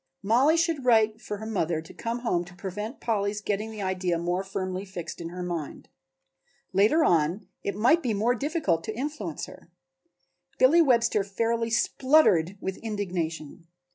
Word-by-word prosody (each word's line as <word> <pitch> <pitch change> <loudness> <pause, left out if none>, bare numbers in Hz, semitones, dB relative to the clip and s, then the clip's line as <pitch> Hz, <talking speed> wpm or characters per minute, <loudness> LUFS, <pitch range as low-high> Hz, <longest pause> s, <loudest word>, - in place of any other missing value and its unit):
Mollie 255 +10 +4
should 330 -4 0
write 220 -2 +3
for 210 - -5
her 220 - -8
mother 175 -7 -1
to 160 - -11
come 235 +1 -4
home 180 -8 0
to 175 0 -14
prevent 210 +7 -6
Polly's 210 -2 -1
getting 210 +1 -2
the 215 -2 -6
idea 185 -2 0
more 175 +3 -1
firmly 190 -1 -4
fixed 180 -4 -7
in 165 - -5
her 180 +1 -6
mind. 170 -4 -5 0.8
Later 215 - +4
on 175 - +2 0.2
it 200 - -3
might 250 +11 +4
be 245 - -1
more 225 +5 +2
difficult 255 - -1
to 220 0 -5
influence 245 - -4
her. - - -15 0.9
Billy 290 +7 +6
Webster 235 -7 +3
fairly 230 +4 -1
spluttered 220 - +3
with 190 -1 -4
indignation. 175 -7 -4
205 Hz, 160 wpm, -27 LUFS, 180-235 Hz, 0.9 s, Billy